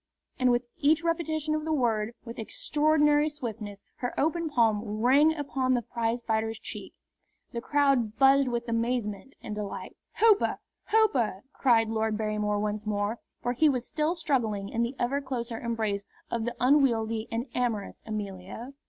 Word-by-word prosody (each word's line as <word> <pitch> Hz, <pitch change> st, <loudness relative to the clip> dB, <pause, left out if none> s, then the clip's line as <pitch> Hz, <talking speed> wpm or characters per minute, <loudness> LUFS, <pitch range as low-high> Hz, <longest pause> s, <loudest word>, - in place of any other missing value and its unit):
And 255 Hz, -1 st, +4 dB
with 240 Hz, 0 st, +2 dB
each 310 Hz, +3 st, +3 dB
repetition 315 Hz, -2 st, 0 dB
of 310 Hz, 0 st, -1 dB
the 320 Hz, -, -2 dB
word, 230 Hz, -5 st, 0 dB
with 230 Hz, 0 st, -8 dB
extraordinary 295 Hz, +5 st, +2 dB
swiftness, 220 Hz, -8 st, -6 dB
her 245 Hz, -, -3 dB
open 325 Hz, +2 st, +1 dB
palm 225 Hz, -7 st, +3 dB
rang 245 Hz, +8 st, +4 dB
upon 265 Hz, -3 st, 0 dB
the 240 Hz, -, -1 dB
prizefighter's 225 Hz, -1 st, -1 dB
cheek. -, -, -8 dB, 0.6 s
The 235 Hz, -, -4 dB
crowd 270 Hz, -6 st, +2 dB
buzzed 270 Hz, +1 st, +5 dB
with 235 Hz, -1 st, -2 dB
amazement 230 Hz, +1 st, -2 dB
and 210 Hz, -, -5 dB
delight. 210 Hz, -1 st, -5 dB, 0.2 s
"Hooper! 435 Hz, -2 st, +4 dB, 0.3 s
Hooper!" 265 Hz, -, +2 dB
cried 230 Hz, -4 st, +3 dB
Lord 220 Hz, -1 st, 0 dB
Barrymore 210 Hz, -1 st, 0 dB
once 210 Hz, 0 st, -2 dB
more, 205 Hz, +2 st, -1 dB, 0.2 s
for 245 Hz, -, 0 dB
he 305 Hz, +5 st, +4 dB
was 250 Hz, -3 st, -1 dB
still 310 Hz, +3 st, 0 dB
struggling 225 Hz, -, -1 dB
in 230 Hz, -, -1 dB
the 235 Hz, +3 st, -1 dB
ever 275 Hz, +4 st, 0 dB
closer 240 Hz, -4 st, -4 dB
embrace 220 Hz, -4 st, -2 dB, 0.3 s
of 230 Hz, -1 st, -1 dB
the 240 Hz, 0 st, -3 dB
unwieldy 230 Hz, -5 st, +3 dB
and 230 Hz, +2 st, -1 dB
amorous 230 Hz, -5 st, -2 dB
Amelia. 210 Hz, +3 st, -6 dB
240 Hz, 155 wpm, -28 LUFS, 220-280 Hz, 0.6 s, buzzed